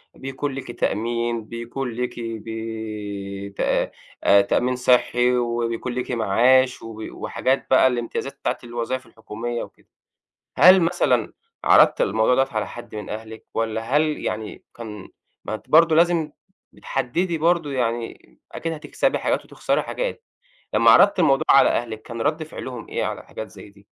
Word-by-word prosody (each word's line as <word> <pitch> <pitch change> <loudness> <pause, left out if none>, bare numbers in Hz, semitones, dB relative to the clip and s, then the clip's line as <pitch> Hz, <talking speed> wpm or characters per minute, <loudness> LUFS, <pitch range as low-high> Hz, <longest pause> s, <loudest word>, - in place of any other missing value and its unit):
بيكون 135 +2 -4
ليكِ 130 -3 -6
تأمين، 115 +1 -1
بيكون 120 +3 -5
ليكِ 125 +1 -4
بي 110 -3 -6
تا 100 - 0 0.5
تأمين 125 +5 +1
صحِّي، 125 0 +3
وبيكون 120 0 -2
ليكِ 125 +1 -3
معاش، 125 +4 +3
وبي 110 -1 -8
وحاجات 130 +1 -1
بقى، 130 0 +6
الامتيازات 120 -2 -3
بتاعة - - -1
الوظايِف 120 +2 -4
الحكومية 115 +1 -5
وكده. - - -15 0.7
هل 185 +1 +8
مثلًا 145 -9 +1 0.3
عرَضتِ - - +6
الموضوع 110 +4 +3
دوَّه 135 +1 +2
على 110 - -1
حد 120 -2 -10
من 105 -1 -6
أهلِك، 110 +1 -8
والّا 110 0 -1 0.2
هل 150 - +5 0.2
يعني 110 -1 -4
كان 105 -4 -9 0.4
ما - - -4
أنتِ 110 - -9
برضو 165 +1 +6
لازِم 165 -2 +3 0.4
بتحدِّدي 160 +7 -2
برضو 165 -1 +1
يعني، 120 -3 -3
أكيد 165 - -4
هتكسَبي 160 - -1
حاجات - - -1
وتخسَري - - -1
حاجات. - - -4 0.5
لمَّا - - +6
عرَضتِ 200 -1 +6
الموضوع 135 -5 +3
على 135 - +7
أهلِك، 115 -2 -2
كان 115 -1 -7
ردّ 155 +4 0
فِعلهُم 130 -6 -8
إيه - - -2
على - - -4
حاجات - - -7
زي - - -13
دي؟ 100 0 -21
120 Hz, 145 wpm, -23 LUFS, 110-135 Hz, 0.7 s, هل